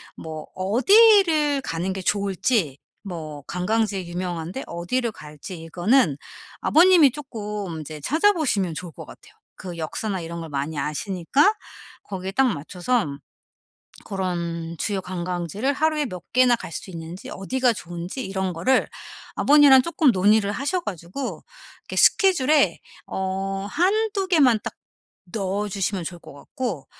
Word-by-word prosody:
뭐 155 -1 -8
어디를 305 - +5
가는 180 -4 -3
게 190 - -5
좋을지 195 - 0 0.2
뭐 155 -7 -7
관광지에 200 +1 -1
유명한데 175 +5 -4
어디를 225 +8 -2
갈지 155 +1 -10
이거는 175 - +2 0.4
아버님이 335 -4 +6
쪼끔 210 - -6
인제 155 0 -8
찾아보시면 300 - +1
좋을 175 +2 -7
것 - - -10
같아요. - - -15 0.2
그 180 -2 -8
역사나 185 +4 -3
이런 170 +1 -6
걸 165 - -7
많이 145 +1 -3
아시니까 190 - +1 0.5
거기에 190 -1 -5
딱 265 +7 +3
맞춰서 185 - -1 1.0
그런 170 -3 -3
주요 200 -3 -1
관광지를 180 - -2
하루에 310 +1 +1
몇 180 -7 -7
개나 255 0 +5
갈 235 - -6
수 170 - -7
있는지 165 +1 -8
어디가 250 +5 0
좋은지 175 +5 -6
이런 190 -1 -2
거를 250 +11 +2 0.5
아버님이랑 285 -3 +6
쪼끔 310 -3 +2
논의를 205 +1 +3
하셔 290 - -1
가지고 190 - -6 0.4
이렇게 - - -8
스케줄에 310 -7 +4 0.3
어 195 +1 -3
1-2 390 - +1
개만 275 - +4
딱 - - -6 0.6
넣어 205 0 -1
주시면 195 -1 -2
좋을 175 +1 -7
것 - - -13
같고 175 - -5
195 Hz, 290 characters per minute, -23 LUFS, 175-265 Hz, 1.0 s, 아버님이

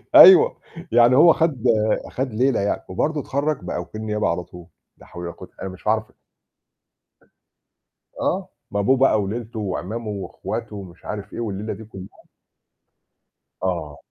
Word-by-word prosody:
أيوَه. 410 +6 +9 0.3
يعني 120 +2 +6
هو 165 +3 +7
خد 155 -8 0 0.5
خد 130 -3 -3
ليلة 125 +1 +2
يعني. 100 +1 -1
وبرضه 150 +11 -1
اتخرج 145 +3 -1
بقى - - -3
وكيل 110 - -8
نيابة 105 -1 -1
على 85 +1 -1
طول. 90 0 -13 0.3
لا - - -17
حول 90 - -9
ولا 85 - -4
قوة - - -12
أنا 95 - -4
مش 95 +2 -11
هاعرف. 110 0 +1 2.1
آه. - - -1 0.2
ما 100 - -1
أبوه 130 +7 +3
بقى 125 -5 +4
وليلته 110 +3 -5
وعمامه 105 +3 -4
وأخواته 100 +1 -5
ومش 95 -4 -11
عارف 105 -1 -6
إيه، - - -6
والليلة 105 -1 -3
دي 110 +3 -10
كلها. 95 -3 -12 1.4
آه. 85 -6 -2
110 Hz, 150 wpm, -22 LUFS, 95-125 Hz, 2.1 s, أيوَه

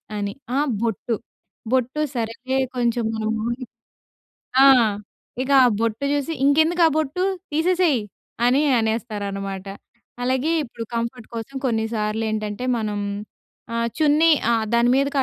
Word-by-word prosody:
అని. 200 -1 -2 0.2
ఆహ్, 290 +1 +1
బొట్టు, 230 +1 -1 0.6
బొట్టు 260 +3 +1
సరేలే 240 +3 -2 0.2
కొంచెం 235 -1 +1
మనము 220 0 -2 1.2
ఆ! - - +8 0.8
ఇక 275 - -3
ఆ - - +6
బొట్టు 230 +4 -1
చూసి 290 +3 -1
"ఇంకెందుకు 315 +5 +3
ఆ - - +3
బొట్టు, 315 +4 -1 0.3
తీసేసేయ్" 335 -4 +2 0.5
అని 260 +4 +4 0.2
అనేస్తారనమాట. 200 -4 -3 0.6
అలాగే 260 +5 +1
ఇప్పుడు 235 -3 -7
కంఫర్ట్ 235 0 -3
కోసం 230 +5 -6
కొన్నిసార్లు 220 -2 -1
ఏంటంటే, 215 +1 -3
మనం 210 -2 -2 0.8
ఆహ్, 230 0 +1
చున్నీ 310 +1 +4 0.2
ఆహ్, 225 -1 +1
దాని 235 +1 +4
మీదకి 275 +1 +1
235 Hz, 120 wpm, -22 LUFS, 220-280 Hz, 1.2 s, ఆ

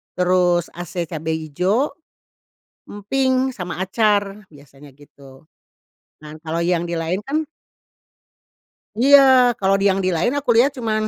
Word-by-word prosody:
terus 180 -1 +1
ase 175 0 -6
cabe 160 0 -3
hijau, 180 - -1 1.0
emping, 260 +5 -1
sama 180 -2 -6
acar, 205 +1 0
biasanya 140 -1 -17
gitu. 140 -1 -18 0.8
Nah 150 - -10
kalau 165 +1 -4
yang 175 -1 0
di 170 - -3
lain 165 +3 -2
kan 305 +3 -1 1.5
Iya. 280 +5 +6 0.4
Kalau 195 0 +2
di 195 - -1
yang 195 - -2
di - - +1
lain 175 +9 0
aku 285 -3 -5
lihat 255 +5 +4
cuma 225 -3 -2
185 Hz, 130 wpm, -20 LUFS, 160-225 Hz, 1.5 s, Iya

